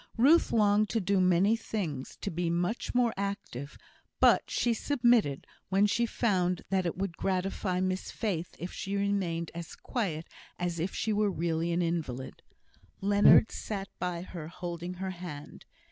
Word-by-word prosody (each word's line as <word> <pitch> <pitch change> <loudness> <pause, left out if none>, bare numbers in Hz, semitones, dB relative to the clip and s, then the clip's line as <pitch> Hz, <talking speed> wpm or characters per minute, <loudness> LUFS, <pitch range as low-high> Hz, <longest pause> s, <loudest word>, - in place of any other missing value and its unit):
Ruth 290 +9 +5
longed 210 -1 +3
to 230 - +1
do 195 -1 +2
many 185 +4 +4
things; 180 - -4
to - - -3
be 170 +1 -1
much 175 +9 -1
more 240 -2 +3
active; 200 - -5 0.4
but - - +5
she 240 - +1
submitted, 235 - +2 0.2
when 195 +2 +4
she 235 +3 +1
found 180 -7 0
that 190 -2 +2
it 170 - -3
would 190 -3 -3
gratify 185 0 -1
Miss 185 0 -1
Faith 180 -7 -3
if 175 - -6
she 195 +1 -4
remained 195 -5 -1
as 170 -1 -7
quiet 170 -10 -3 0.3
as 175 -1 -2
if 180 +4 -2
she 220 - 0
were 210 0 +2
really 170 -1 -1
an 175 +1 +1
invalid. 155 -7 -3 0.6
Leonard 205 +2 +6
sat 195 -3 -5
by 180 -1 -2
her 170 -4 -7
holding 175 +1 -5
her 190 +1 -4
hand. 170 -5 -9
185 Hz, 160 wpm, -30 LUFS, 170-205 Hz, 0.6 s, Leonard